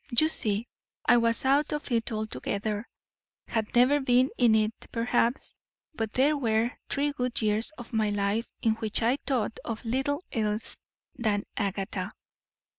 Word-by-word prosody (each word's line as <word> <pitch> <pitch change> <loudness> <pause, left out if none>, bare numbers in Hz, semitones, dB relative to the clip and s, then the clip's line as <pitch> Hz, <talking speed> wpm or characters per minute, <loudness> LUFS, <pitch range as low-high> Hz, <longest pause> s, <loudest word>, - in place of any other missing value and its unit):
You 310 +4 +5
see, 215 -5 +3 0.4
I - - +6
was 230 +2 +2
out 280 +3 +3
of 295 -2 -4
it 230 0 +1
altogether; 215 0 -3 0.6
had 220 -1 -2
never 255 +4 +5
been 255 -1 +3
in 235 -3 +4
it, 215 0 +2 0.2
perhaps; 235 +1 +1 0.4
but 225 -6 -3
there 285 +4 +3
were 230 -3 +1 0.2
three 290 +1 0
good 250 -3 -2
years 215 0 +1
of 240 0 -10
my 220 -1 +2
life 205 +2 -1
in 225 - +4
which 220 0 -2
I 245 +4 +3
thought 240 -5 0
of 230 0 -5
little 270 +7 -1
else 215 -1 -2 0.4
than 210 -3 +1
Agatha. 195 -1 -2
230 Hz, 150 wpm, -28 LUFS, 215-255 Hz, 0.6 s, I